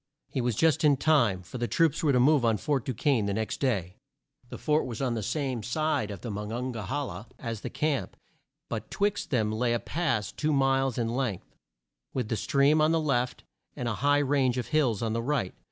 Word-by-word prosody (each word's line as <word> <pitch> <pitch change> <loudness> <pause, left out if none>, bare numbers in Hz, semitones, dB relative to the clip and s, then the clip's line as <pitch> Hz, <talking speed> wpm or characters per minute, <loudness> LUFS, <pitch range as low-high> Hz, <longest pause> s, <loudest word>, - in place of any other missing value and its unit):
He 130 - -1
was 120 -2 0
just 160 +5 +3
in 145 -2 +5
time, 120 -12 +3
for 90 +9 -8
the 120 - 0
troops 165 +1 +2
were 150 - +3
to 125 - +3
move 140 +1 +4
on 115 -2 +3
Fort 140 +1 -1
Du 130 - -2
quesne 120 -5 +1
the 100 - -1
next 110 0 -2
day. 95 -10 -1 0.5
The - - -7
fort 150 -2 +1
was 115 -3 -5
on 130 -3 0
the 115 - -2
same 130 +1 -2
side 145 -1 -1
of 100 -4 -7
the 115 - -5
Mon 105 +1 -5
on 125 +3 -2
ga 110 -5 -6
he - - -7
la 125 -9 -3
as 115 -3 -5
the - - -4
camp, 140 - -2 0.5
but 110 -1 -5
twixt 205 0 -1
them 110 -5 +1
lay 120 +2 +1
a 120 - +1
pass 145 -11 -1
two 155 0 -1
miles 135 -2 +2
in 115 -2 0
length, 120 -6 -3 0.6
with 125 -5 -1
the - - 0
stream 145 +4 +3
on 155 +1 +4
the 165 - +3
left 125 -5 -1 0.3
and 125 - -3
a 120 - 0
high 145 +1 +4
range 135 -3 +2
of 125 - -3
hills 130 -8 +1
on 110 -1 -1
the 115 - -1
right. 125 -7 -1
125 Hz, 230 wpm, -28 LUFS, 110-145 Hz, 0.6 s, in